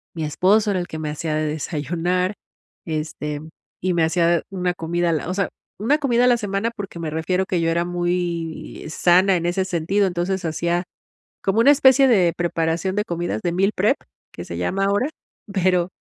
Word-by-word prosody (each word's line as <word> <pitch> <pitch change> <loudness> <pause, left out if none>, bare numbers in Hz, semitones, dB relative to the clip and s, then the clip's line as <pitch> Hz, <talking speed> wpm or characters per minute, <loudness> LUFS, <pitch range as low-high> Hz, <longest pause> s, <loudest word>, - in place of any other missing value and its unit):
Mi 160 - -3
esposo 205 +7 +3
era 185 - 0
el 175 - -4
que 160 - -6
me 155 - -3
hacía 155 0 -3
de 155 - 0
desayunar, 165 +5 -1 0.5
este, 150 -2 -4 0.4
y 185 0 +1
me 170 - +2
hacía 170 0 +2
una 180 -2 -1
comida 170 +1 -1
a - - +1
la 160 +2 -2
o - - -1
sea, 195 - 0 0.3
una 255 +8 +2
comida 245 -4 +2
a - - +5
la 245 -1 +5
semana, 205 +1 -2
porque 200 -4 -7
me 160 - -3
refiero 180 +4 0
a - - -7
que 175 -3 0
yo 165 - +1
era 170 +1 +1
muy 175 -3 -3
sana 180 +4 +4
en 170 - -1
ese 185 +2 0
sentido. 190 +3 +1
Entonces 180 +1 -2
hacía 170 +2 -1 0.6
como 195 +3 +1
una 275 +5 +7
especie 270 -1 +6
de 185 -9 +4
preparación 170 +2 -1
de 210 - +1
comidas 170 -10 -3
de 175 - -1
meal 195 +4 +2
prep, - - +2 0.4
que - - -7
se 85 - -6
llama 190 - 0
ahora, 205 +8 +1 0.4
pero 180 -2 +2
175 Hz, 200 wpm, -22 LUFS, 165-195 Hz, 0.6 s, una